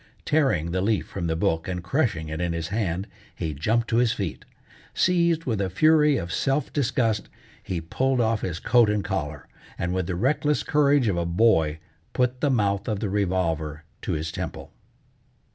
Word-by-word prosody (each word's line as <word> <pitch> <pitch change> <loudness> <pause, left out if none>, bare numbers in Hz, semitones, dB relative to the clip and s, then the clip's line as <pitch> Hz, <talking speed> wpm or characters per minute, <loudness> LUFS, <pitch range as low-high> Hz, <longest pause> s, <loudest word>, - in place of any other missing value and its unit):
Tearing 130 - +1
the 90 +1 0
leaf 105 +1 +1
from 85 -3 -4
the 80 - 0
book, 80 -1 0
and 90 -2 -3
crushing 115 - 0
it 80 +2 -4
in 85 -1 -1
his 85 -1 -3
hand, 95 -3 -1 0.3
he 80 -2 -3
jumped 115 +11 0
to 115 - +2
his 120 -1 +3
feet. 95 -6 -5 0.5
Seized 170 -2 +2
with 110 -6 -1
a 95 - -1
fury 150 - +4
of 85 -5 -4
self 135 +2 0
disgust, 120 -6 0 0.3
he 90 - -3
pulled 130 +10 0
off 115 -2 +1
his 85 -3 -3
coat 120 0 +4
and 105 -1 0
collar, 75 -7 -3 0.3
and 90 +1 -2
with 95 -2 -1
the 95 - -2
reckless 145 +8 +1
courage 145 -4 +3
of 95 -4 +1
a 85 - 0
boy 85 -5 +3 0.4
put 125 0 0
the 145 - +2
mouth 100 -5 +1
of 105 -3 -1
the 105 -2 -2
revolver 85 -6 -1 0.2
to - - -2
his 80 +1 -3
temple. - - -6
100 Hz, 185 wpm, -25 LUFS, 85-125 Hz, 0.5 s, fury